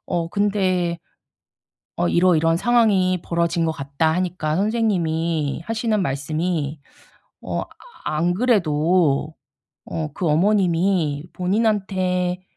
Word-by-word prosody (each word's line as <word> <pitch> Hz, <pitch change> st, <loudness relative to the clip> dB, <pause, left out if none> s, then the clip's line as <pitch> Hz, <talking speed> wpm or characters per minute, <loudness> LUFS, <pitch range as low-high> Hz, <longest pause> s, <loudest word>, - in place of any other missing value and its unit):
어 170 Hz, -2 st, -1 dB
근데 185 Hz, -4 st, 0 dB, 1.0 s
"어 90 Hz, -, +1 dB
이러이러한 165 Hz, -2 st, +3 dB
상황이 195 Hz, -5 st, +2 dB
벌어진 170 Hz, 0 st, 0 dB
것 160 Hz, -, +1 dB
같다." 140 Hz, +3 st, -1 dB
하니까 175 Hz, -4 st, -1 dB
선생님이 170 Hz, -9 st, 0 dB
하시는 225 Hz, -2 st, 0 dB
말씀이 155 Hz, +1 st, -2 dB, 0.6 s
어 -, -, -3 dB, 0.4 s
안 165 Hz, +3 st, 0 dB
그래도 165 Hz, -, +2 dB, 0.5 s
어 155 Hz, -2 st, -4 dB
그 180 Hz, -, -3 dB
어머님이 170 Hz, -3 st, +1 dB
본인한테 185 Hz, -2 st, 0 dB
175 Hz, 220 characters per minute, -22 LUFS, 160-195 Hz, 1.0 s, 이러이러한